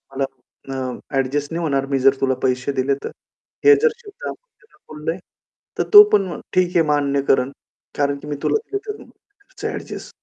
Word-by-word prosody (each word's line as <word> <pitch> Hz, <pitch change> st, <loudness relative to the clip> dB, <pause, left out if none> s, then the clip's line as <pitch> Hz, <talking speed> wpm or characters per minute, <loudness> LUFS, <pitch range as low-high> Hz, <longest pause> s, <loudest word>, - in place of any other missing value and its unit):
मला 135 Hz, -, 0 dB, 0.5 s
अ, 135 Hz, -, -4 dB, 0.4 s
ॲडजस्ट" 140 Hz, +3 st, -1 dB
"नाही 170 Hz, -, -2 dB
होणार, 140 Hz, -3 st, 0 dB
मी 135 Hz, -1 st, -1 dB
जर 135 Hz, +1 st, +5 dB
तुला 130 Hz, -1 st, +2 dB
पैसे 130 Hz, +1 st, 0 dB
दिले 135 Hz, +1 st, +1 dB
तर." -, -, -3 dB, 0.6 s
हे 430 Hz, -, +9 dB
जर 470 Hz, -, +5 dB
शब्द 475 Hz, 0 st, -10 dB
आपण -, -, -6 dB, 0.2 s
त्याला -, -, -26 dB, 0.2 s
बोलले, 155 Hz, +2 st, -3 dB, 0.6 s
तर -, -, +3 dB
तो 415 Hz, 0 st, +13 dB
पण 200 Hz, -, +5 dB
मग 175 Hz, -, -6 dB
ठीक 180 Hz, -1 st, +2 dB
आहे 165 Hz, -, +5 dB
मान्य 140 Hz, -2 st, +1 dB
करेल. 130 Hz, 0 st, +3 dB, 0.5 s
कारण 140 Hz, 0 st, +1 dB
की 150 Hz, -, -11 dB
मी 145 Hz, -, -3 dB
तुला -, -, +2 dB, 0.2 s
देऊन 420 Hz, +1 st, -4 dB
माझं 405 Hz, +1 st, -11 dB
ॲडजस्ट -, -, -7 dB
145 Hz, 190 wpm, -21 LUFS, -, 0.6 s, तो